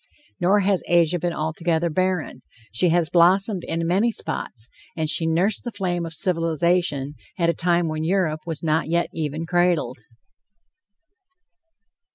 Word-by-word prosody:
Nor 195 +3 +3
has 195 -1 +1
Asia 175 0 +3
been 175 +2 -1
altogether 165 +1 -1
barren; 185 -6 -1 0.3
she 170 +10 +2
has 170 -1 +1
blossomed 185 +2 +3
in 165 0 -2
many 195 +7 +2
spots, 115 - -4 0.3
and 160 -1 -1
she 160 +1 +1
nursed 175 +6 +1
the 240 - -4
flame 180 -5 -2
of 165 - -7
civilization 165 -4 0 0.2
at 170 -2 +2
a - - -5
time 170 +1 +1
when 155 0 -3
Europe 165 -3 0
was 165 -1 -5
not 160 0 +1
yet 170 +1 0
even 155 0 -3
cradled. 175 -7 +1
170 Hz, 145 wpm, -23 LUFS, 160-180 Hz, 0.3 s, Nor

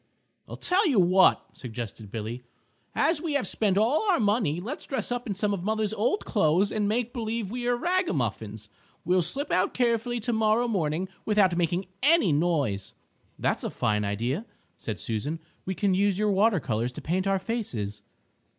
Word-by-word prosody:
"I - - -6
tell 370 +2 +2
you 250 -8 +3
what," 185 +1 +5
suggested 115 -3 -7
Billy, 115 +3 -5 0.5
"as 325 -1 +2
we 330 -3 -2
have 285 -6 +1
spent 200 -2 +1
all 280 - +2
our 360 - +4
money, 205 -7 +1
let's 240 +11 -6
dress 265 -2 -2
up 245 0 -2
in 200 - -2
some 205 +1 0
of 185 -3 -3
mother's 215 +1 0
old 225 - 0
clothes 190 +1 +2
and 210 -2 0
make 240 +2 -1
believe 225 -3 -3
we 245 0 -3
are 245 - +3
rag 360 +6 +1
a - - 0
muffins. 110 -4 -3 0.4
We'll 180 +2 +3
slip 275 - -1
out 185 - +1
carefully 240 0 +1
tomorrow 220 0 +2
morning, 175 -4 -1 0.2
without 205 -4 +3
making 175 +2 0 0.2
any 285 - +4
noise." 145 - 0 0.4
"That's - - -1
a - - -1
fine 105 0 0
idea," 120 - -2 0.3
said 105 -5 -5
Susan. 115 - -3 0.3
"We 190 - -2
can 195 +2 +1
use 195 0 +2
your 210 0 +2
water 200 0 +3
colors 120 -2 -2
to - - -7
paint 185 +4 0
our 195 0 +3
faces." 120 - -4
195 Hz, 180 wpm, -27 LUFS, 150-230 Hz, 0.5 s, what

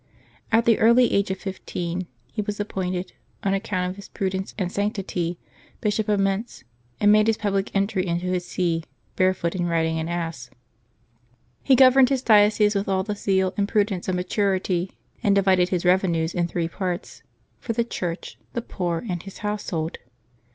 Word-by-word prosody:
At 230 +1 +4
the 230 -2 +4
early 235 +2 +5
age 200 0 +2
of 190 - -2
fifteen 180 -2 -4 0.3
he - - -1
was 210 0 -4
appointed, 185 -3 -3 0.3
on 195 - +1
account 195 -2 -1
of 190 - -10
his 200 - -11
prudence 190 0 -3
and 185 -4 -2
sanctity, 190 -4 -2 0.4
Bishop 215 0 0
of 205 -1 +2
]\Ietz, 195 +4 -1 0.4
and 205 0 +5
made 215 +1 +5
his 225 -1 +2
public 200 -1 -1
entry 195 -1 +1
into 170 +1 -1
his 180 -1 -1
see 175 -2 -1 0.3
barefoot 185 -2 +1
and 175 -2 -1
riding 160 -1 +1
an 160 +1 -3
ass. 165 -7 -4 1.1
He 270 - +4
governed 260 0 +7
his 265 -2 0
diocese 210 -1 +5
with 200 0 -1
all 190 -1 +1
the 210 +1 -3
zeal 190 -2 +1
and 200 0 0
prudence 200 -4 0
of 185 - 0
maturity, 185 -1 0 0.3
and 205 -4 +3
divided 185 -2 +3
his 180 -1 -1
revenues 175 -3 +2
in 175 -1 0
three 170 -1 -2
parts 180 0 -4 0.2
— - - -41
for 230 - -3
the 235 +1 +1
Church, 175 -7 -5
the 235 - -3
poor, 175 -6 -3
and 175 -4 -3
his 195 +1 -10
household. 175 -6 -3
190 Hz, 175 wpm, -24 LUFS, 180-210 Hz, 1.1 s, governed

